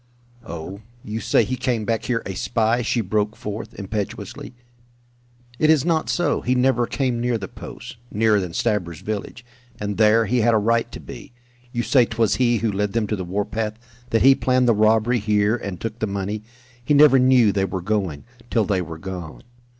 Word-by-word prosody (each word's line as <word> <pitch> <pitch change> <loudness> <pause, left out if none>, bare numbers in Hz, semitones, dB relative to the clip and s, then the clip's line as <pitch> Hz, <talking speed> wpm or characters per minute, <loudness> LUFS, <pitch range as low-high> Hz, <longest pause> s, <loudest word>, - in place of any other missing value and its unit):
"Oh, 85 +5 -7 0.2
you 110 +1 -4
say - - +3
he 130 - -2
came 120 -4 -1
back 115 0 -1
here 120 -2 -1
a 95 - -4
spy!" 115 +4 0
she 120 0 0
broke 105 +1 -1
forth, 105 +1 -6
impetuously. 105 +3 -5 1.0
"It 155 - +3
is 155 -3 +4
not 165 -2 +1
so! 175 -5 +1
He 125 +1 0
never 125 -1 +2
came 125 -4 -1
near 120 -1 0
the 100 -3 -6
post, - - -10
nearer 105 0 +3
than 90 -4 -5
Stabber's 90 -8 -1
village, 110 +2 -5 0.3
and 105 -1 -3
there 110 +1 +4
he 120 +4 +1
had 115 0 +3
a - - +5
right 115 +2 +1
to - - -8
be. 135 - -11 0.4
You 120 -1 -2
say 125 -2 +4
'twas 115 -1 +1
he 120 -2 +3
who 110 0 0
led 100 0 -1
them 115 -2 +1
to 105 - -2
the 95 - -4
warpath, 105 +4 -3 0.3
that 115 -2 +2
he 135 +1 +8
planned 130 -1 +1
the 120 - +5
robbery 110 +3 +3
here 105 +1 +2
and 100 -6 -6
took 115 0 -5
the 110 - -1
money. 100 +1 -3 0.4
He 145 +5 +2
never 140 -2 +7
knew 125 -4 +5
they 95 -1 0
were 95 0 -3
going, 95 -7 -2 0.3
till 115 -3 +2
they 95 -2 0
were 80 -2 -7
gone. 90 -2 -7
110 Hz, 195 wpm, -22 LUFS, 100-120 Hz, 1.0 s, he